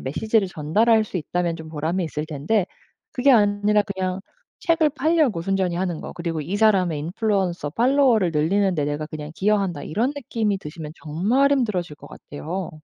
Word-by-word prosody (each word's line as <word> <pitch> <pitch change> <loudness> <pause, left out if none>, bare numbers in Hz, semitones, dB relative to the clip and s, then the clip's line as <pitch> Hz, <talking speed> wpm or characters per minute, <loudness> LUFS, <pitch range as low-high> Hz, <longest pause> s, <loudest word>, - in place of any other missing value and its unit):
메시지를 205 - 0
전달할 215 +9 +2
수 200 - -6
있다면 175 +1 -1
좀 160 -1 -9
보람이 160 +4 -2
있을 155 -1 -4
텐데 165 +7 0 0.5
그게 265 +2 +3
아니라 205 -2 +4
그냥 190 -1 -3 0.4
책을 330 -3 +3
팔려고 300 - +1
순전히 185 -1 0
하는 175 -3 -2
거 - - -7
그리고 165 -2 -3
'이 175 +7 -4
사람의 190 -7 +3
인플루언서 180 -2 -1
팔로워를 240 - +3
늘리는데 165 +1 +1
내가 145 +1 -3
그냥 155 -1 -7
기여한다.' 195 -6 0
이런 235 - -1
느낌이 220 -7 -2
드시면 150 -2 -8
정말 205 - +1
힘들어질 200 - 0
것 - - -13
같아요. 175 +6 -6
190 Hz, 390 characters per minute, -23 LUFS, 160-220 Hz, 0.5 s, 아니라